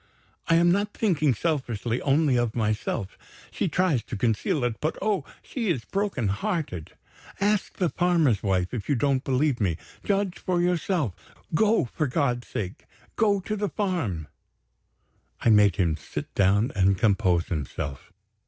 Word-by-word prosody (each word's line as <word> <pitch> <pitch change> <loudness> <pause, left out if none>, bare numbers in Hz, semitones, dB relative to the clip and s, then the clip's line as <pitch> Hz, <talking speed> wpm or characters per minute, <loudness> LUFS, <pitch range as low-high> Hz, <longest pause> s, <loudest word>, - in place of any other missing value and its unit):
I 165 - +4
am 170 +1 +5
not 205 +3 0
thinking 155 - +2
selfishly 125 -6 -1
only 145 -1 +3
of 120 -2 0
myself. 105 -3 -2 0.3
She - - -1
tries 175 -7 +1
to 115 - -5
conceal 115 +5 0
it 120 -2 -1
but, 155 - -1
oh, 205 -1 0 0.2
she 230 -6 -3
is 130 -10 -1
broken 195 - -1
hearted! 105 - -3 0.5
Ask 205 0 0
the 180 -3 +1
farmer's 165 - +2
wife, 95 -1 0
if 120 +1 -4
you 145 - +3
don't 135 +1 +1
believe 135 -1 +1
me. 85 -6 +1 0.3
Judge 200 -2 0
for 180 -1 0
yourself, 175 - 0
sir. - - -23 0.2
Go 215 -1 +3
for 145 +5 -2
God's 125 -3 0
sake, 95 -2 -5 0.3
go 205 -3 +2
to 215 +3 -3
the 205 -1 -1
farm." 160 - -2 1.1
I 115 - +3
made 105 -4 +5
him 85 -4 +1
sit 75 - -7
down 100 +5 +3
and 95 0 +3
compose 95 -5 +2
himself. 70 -3 -4
135 Hz, 155 wpm, -26 LUFS, -, 1.1 s, am